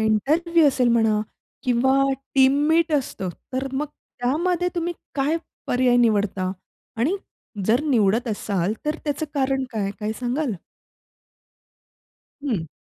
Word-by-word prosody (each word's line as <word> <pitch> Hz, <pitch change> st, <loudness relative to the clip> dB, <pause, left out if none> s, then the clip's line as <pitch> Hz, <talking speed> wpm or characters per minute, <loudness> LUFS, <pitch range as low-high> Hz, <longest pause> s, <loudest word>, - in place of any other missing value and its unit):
Interview 310 Hz, -, +3 dB
असेल 255 Hz, -2 st, +2 dB
म्हणा 220 Hz, -2 st, +3 dB, 0.4 s
किंवा 265 Hz, +2 st, +3 dB, 0.3 s
टीम 265 Hz, 0 st, +6 dB, 0.2 s
मीट 325 Hz, 0 st, +3 dB
असतं 250 Hz, -9 st, -1 dB, 0.2 s
तर 260 Hz, +1 st, -1 dB
मग 280 Hz, +3 st, -1 dB
त्यामध्ये 335 Hz, +8 st, -1 dB
तुम्ही 345 Hz, 0 st, -1 dB, 0.2 s
काय 285 Hz, +3 st, +1 dB, 0.3 s
पर्याय 250 Hz, -1 st, +3 dB
निवडता. 205 Hz, -5 st, +2 dB, 0.5 s
आणि 280 Hz, -, +1 dB, 0.5 s
जर 230 Hz, +3 st, +4 dB
निवडत 230 Hz, -3 st, +2 dB
असाल 200 Hz, -3 st, -1 dB
तर 300 Hz, -, 0 dB
त्याचं 300 Hz, +1 st, -1 dB
कारण 270 Hz, -1 st, +1 dB
काय? 200 Hz, -3 st, -1 dB
काय 215 Hz, +1 st, -1 dB
सांगाल? 255 Hz, +2 st, -1 dB, 1.9 s
हं. 200 Hz, -, -1 dB
255 Hz, 115 wpm, -23 LUFS, 220-300 Hz, 1.9 s, टीम